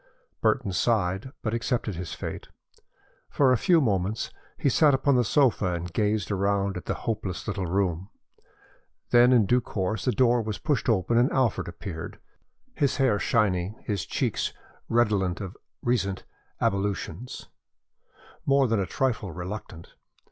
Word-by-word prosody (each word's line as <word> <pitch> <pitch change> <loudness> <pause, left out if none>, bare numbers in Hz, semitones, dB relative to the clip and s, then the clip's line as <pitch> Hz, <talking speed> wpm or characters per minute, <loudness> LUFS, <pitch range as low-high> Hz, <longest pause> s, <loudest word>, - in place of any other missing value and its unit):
Burton 95 - +1
sighed 100 +2 0
but 110 - -1
accepted 115 -2 -1
his 85 -1 -5
fate. - - -6 0.8
For 135 -3 +3
a - - +5
few 170 +8 +4
moments 105 - 0 0.3
he - - 0
sat 145 +1 +5
upon 140 +1 +2
the 125 - +4
sofa 115 -7 +2
and 85 0 -6
gazed 105 0 0
around 100 0 0
at 90 - -6
the - - -1
hopeless 105 -7 -3
little 100 -4 -2
room. 95 0 -1 1.0
Then, 120 +1 +6
in 120 -5 +5
due 125 +5 +3
course, 105 0 -3
the 125 - +3
door 120 -1 +3
was 110 -1 -4
pushed 145 -4 0
open 115 +2 +2
and 125 - +3
Alfred 130 -5 +1
appeared, 85 -1 -7 0.6
his 140 - 0
hair 130 -7 +3
shiny, 100 -6 +1
his 100 -6 -2
cheeks - - -1 0.4
redolent 105 -6 +2
of 95 -1 -6 0.3
recent 100 -6 0 0.4
ablutions, 100 +4 -2 0.9
more 140 -1 +3
than 115 -2 +1
a 95 - -1
trifle 115 -8 -1
reluctant. 90 -1 -7
105 Hz, 145 wpm, -26 LUFS, 95-120 Hz, 1.0 s, Then